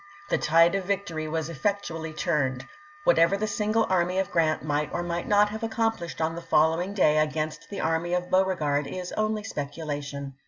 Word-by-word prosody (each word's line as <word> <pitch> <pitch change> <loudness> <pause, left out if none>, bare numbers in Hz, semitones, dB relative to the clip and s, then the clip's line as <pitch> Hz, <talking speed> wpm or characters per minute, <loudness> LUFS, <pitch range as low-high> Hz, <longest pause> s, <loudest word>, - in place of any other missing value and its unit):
The - - +1
tide 165 +3 +4
of 195 -2 -1
victory 180 -5 -2
was 160 0 -2
effectually 165 -1 -2
turned. 135 -4 -1 0.4
Whatever 170 - +4
the 215 - -1
single 215 +2 +1
army 180 0 +1
of 190 -1 0
Grrant 160 -2 +1
might 150 0 -1
or 175 - -2
might 170 0 -3
not 205 0 +4
have 220 +1 -6
accomplished 225 -6 -2
on 160 0 0
the 170 - -6
following 165 +4 +2
day 155 -6 +4
against 155 0 -2
the 200 - -4
army 165 +2 0
of 180 0 -3
Beauregard 155 -7 +1
is 180 +4 -5
only 215 0 -1
speculation. 145 -4 -5
170 Hz, 180 wpm, -26 LUFS, 155-195 Hz, 0.4 s, tide